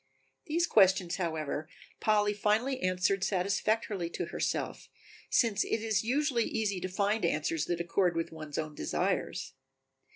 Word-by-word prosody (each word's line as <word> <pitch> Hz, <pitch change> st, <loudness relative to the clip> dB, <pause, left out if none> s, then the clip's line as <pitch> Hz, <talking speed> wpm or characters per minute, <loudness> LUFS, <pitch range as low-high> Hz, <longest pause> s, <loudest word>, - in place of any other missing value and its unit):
These 335 Hz, +2 st, +2 dB
questions, 190 Hz, -, +4 dB
however, 160 Hz, -3 st, -3 dB, 0.3 s
Polly 210 Hz, -1 st, +3 dB
finally 220 Hz, +6 st, +1 dB
answered 185 Hz, +1 st, +1 dB
satisfactorily 200 Hz, 0 st, 0 dB
to -, -, -3 dB
herself, -, -, -3 dB, 0.4 s
since 220 Hz, -5 st, +3 dB
it 225 Hz, -, -2 dB
is 220 Hz, -2 st, +1 dB
usually 255 Hz, 0 st, +1 dB
easy 205 Hz, -4 st, -1 dB
to 185 Hz, -, -3 dB
find 205 Hz, +3 st, 0 dB
answers 160 Hz, -1 st, 0 dB
that 175 Hz, -1 st, -2 dB
accord 175 Hz, +1 st, +1 dB
with 165 Hz, 0 st, -2 dB
one's 155 Hz, -2 st, -7 dB
own 155 Hz, -1 st, -3 dB
desires. -, -, -2 dB
195 Hz, 135 wpm, -31 LUFS, 170-220 Hz, 0.4 s, questions